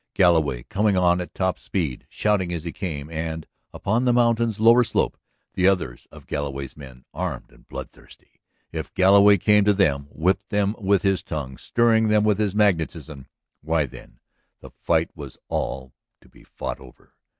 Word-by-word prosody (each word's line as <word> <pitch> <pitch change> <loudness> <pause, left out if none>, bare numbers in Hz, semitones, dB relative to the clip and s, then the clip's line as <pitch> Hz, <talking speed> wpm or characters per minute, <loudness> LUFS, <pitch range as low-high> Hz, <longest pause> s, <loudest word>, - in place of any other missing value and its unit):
Galloway 80 -9 +3
coming 100 - 0
on 90 0 +3
at 90 - -9
top 95 -1 -1
speed, 80 -10 -3
shouting 100 -4 0
as 85 -3 -4
he 85 - -4
came, 75 -7 -5
and, 80 0 -4 0.3
upon 110 +5 -1
the 125 - +4
mountain's 115 -2 +2
lower 115 +2 +6
slope - - 0 0.4
the 90 - +2
others 90 -11 -1
of - - -14
Galloway's 70 -2 -4
men, 65 -4 -13
armed 80 -4 -5
and - - -22
bloodthirsty. - - -12 0.3
If - - -6
Galloway 100 +2 +6
came 105 +2 +4
to 105 -1 +4
them, 70 -8 +1
whipped 95 +7 -1
them 105 0 0
with 100 -3 +2
his 95 -1 +1
tongue, 70 -5 -5
stirring 115 -2 +2
them 105 -1 +3
with 105 -1 +2
his 105 -2 0
magnetism... 80 -8 0 0.3
why, 80 0 0
then, 65 - -14 0.4
the - - -13
fight 80 -1 0
was 70 -5 -10
all 65 -1 -3 0.3
to - - -22
be - - -20
fought - - -6
over. 65 -1 -17
90 Hz, 170 wpm, -23 LUFS, 75-105 Hz, 0.4 s, lower